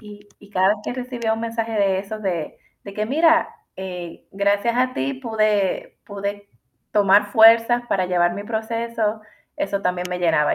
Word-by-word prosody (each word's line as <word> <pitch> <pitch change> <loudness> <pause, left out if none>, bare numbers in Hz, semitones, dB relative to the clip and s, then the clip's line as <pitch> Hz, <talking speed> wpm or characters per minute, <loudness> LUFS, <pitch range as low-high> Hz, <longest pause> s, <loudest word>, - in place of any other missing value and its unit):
Y 205 -1 -13
y 205 - -18
cada 190 -1 +3
vez 210 - +2
que - - -3
recibía 245 -3 -3
un 225 - -2
mensaje 230 0 -3
de 195 -3 +1
esos, 215 +2 -6
de 175 -5 -3 0.3
de 200 -1 -9
que, 215 0 -2
mira, 320 +4 +3 0.3
eh, 180 -3 -7
gracias 200 +4 +1
a 255 0 +1
ti 135 +1 -2
pude 210 - -1
pude 200 0 -6 0.4
tomar 205 0 +4
fuerzas 230 +2 +6
para 185 -2 +1
llevar 175 -1 +1
mi 200 +2 -6
proceso, 225 -1 -2 0.4
eso 205 -10 -2
también 180 -1 -1
me 180 - -2
llenaba. 160 -4 +2
205 Hz, 170 wpm, -22 LUFS, 190-230 Hz, 0.4 s, fuerzas